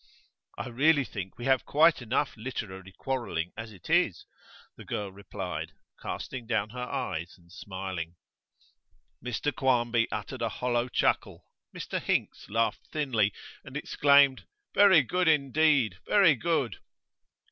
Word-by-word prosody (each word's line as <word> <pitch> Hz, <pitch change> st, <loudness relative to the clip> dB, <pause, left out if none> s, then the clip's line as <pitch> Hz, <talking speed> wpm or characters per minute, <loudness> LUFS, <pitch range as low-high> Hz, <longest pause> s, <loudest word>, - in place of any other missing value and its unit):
'I 130 Hz, -, -5 dB
really 140 Hz, +4 st, +3 dB
think 95 Hz, -6 st, -7 dB
we 120 Hz, -, -6 dB
have 135 Hz, -2 st, +3 dB
quite 160 Hz, 0 st, +4 dB
enough 125 Hz, +4 st, -1 dB
literary 100 Hz, -5 st, -6 dB
quarrelling 95 Hz, -7 st, -3 dB
as 115 Hz, -1 st, -7 dB
it 95 Hz, -5 st, -14 dB
is,' -, -, +2 dB, 0.5 s
the -, -, -11 dB
girl 100 Hz, -2 st, -4 dB
replied, 95 Hz, -2 st, -6 dB, 0.3 s
casting 125 Hz, -3 st, -5 dB
down 110 Hz, -3 st, 0 dB
her 125 Hz, 0 st, -5 dB
eyes 95 Hz, -, -3 dB
and 85 Hz, -1 st, -23 dB
smiling. 95 Hz, -3 st, -6 dB, 1.1 s
Mr 125 Hz, +4 st, -2 dB
Quarmby 120 Hz, -3 st, +2 dB
uttered -, -, -5 dB
a -, -, 0 dB
hollow 120 Hz, -1 st, -1 dB
chuckle, 125 Hz, -, 0 dB, 0.3 s
Mr -, -, -4 dB
Hinks -, -, -1 dB
laughed 115 Hz, +2 st, 0 dB
thinly 120 Hz, -9 st, +1 dB, 0.3 s
and -, -, -7 dB
exclaimed, 140 Hz, -2 st, +4 dB, 0.3 s
'Very 190 Hz, -7 st, +7 dB
good 180 Hz, +7 st, 0 dB
indeed! 145 Hz, -4 st, +3 dB
Very 195 Hz, -7 st, +6 dB
good! 135 Hz, -, -1 dB
120 Hz, 130 wpm, -28 LUFS, 100-140 Hz, 1.1 s, Very